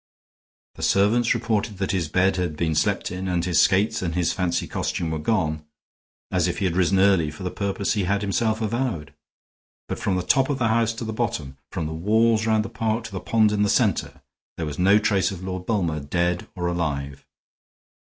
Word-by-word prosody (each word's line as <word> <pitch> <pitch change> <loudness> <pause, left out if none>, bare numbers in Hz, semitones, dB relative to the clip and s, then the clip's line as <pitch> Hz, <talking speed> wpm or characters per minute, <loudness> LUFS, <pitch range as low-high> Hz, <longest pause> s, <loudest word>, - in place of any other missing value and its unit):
The - - -12
servants 115 +5 +3
reported 110 -3 -1
that 95 0 -1
his 90 -5 -1
bed 95 +3 +2
had 85 -4 -2
been 80 -1 0
slept 75 +2 0
in 90 +1 -4
and 90 -2 0
his 90 -3 +3
skates 100 +3 +2
and 85 -3 -2
his 90 -1 +1
fancy 90 -2 -1
costume 80 -2 -2
were 80 - -2
gone, 80 -5 0 0.7
as 90 -2 +2
if 90 - -2
he 100 - -1
had 90 -2 0
risen 95 +1 +2
early 95 -5 +4
for 75 +5 -9
the 90 - -3
purpose 100 0 -1
he 100 -4 0
had 100 +2 0
himself 110 +2 0
avowed. 110 - -2 0.7
But - - -4
from 95 - 0
the 90 - -1
top 130 +9 +2
of 145 - 0
the 120 -4 +1
house 115 0 +2
to 115 +1 -6
the 110 - -4
bottom, 80 - -3
from 90 -5 -3
the 80 - -4
walls 110 +6 +2
round 110 -1 +2
the - - -5
park 110 0 -1
to 115 - -8
the 95 - -4
pond 110 0 +2
in 105 -1 0
the 105 - +2
center, - - 0 0.3
there 80 - -2
was 75 +1 -6
no 95 +3 +5
trace 100 -3 +2
of 95 -2 -7
Lord 95 -1 -5
Bulmer, 85 -9 0
dead 85 +4 -1
or 90 - -3
alive. 70 -6 -3
95 Hz, 210 wpm, -24 LUFS, 85-110 Hz, 0.7 s, no